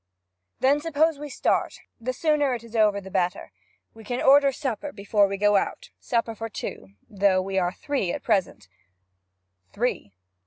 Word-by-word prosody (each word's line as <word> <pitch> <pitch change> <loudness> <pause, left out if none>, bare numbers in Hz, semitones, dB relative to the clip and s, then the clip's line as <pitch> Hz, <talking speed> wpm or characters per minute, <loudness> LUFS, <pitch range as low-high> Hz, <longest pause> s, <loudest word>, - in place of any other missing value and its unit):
'Then 280 +3 +3
suppose 320 -1 +1
we 295 0 -6
start; - - 0 0.2
the 250 +3 -2
sooner 290 -1 +1
it 235 - -8
is 230 0 -12
over 210 -2 +3
the 190 -1 -11
better. 180 -1 -1 0.4
We 225 - -13
can 245 +3 -3
order 280 0 +6
supper 265 +1 -4
before 205 -1 +2
we 195 0 -4
go 205 0 +4
out - - -3
supper 230 -1 -1
for 225 +1 -6
two; 95 - -7
for 205 - -17
though 195 -2 +4
we 190 0 -1
are 175 -1 0
three 260 -6 -2
at - - -5
present 185 - 0 0.5
' 95 0 -46
'Three?' 220 - -2
215 Hz, 180 wpm, -25 LUFS, 190-265 Hz, 0.5 s, order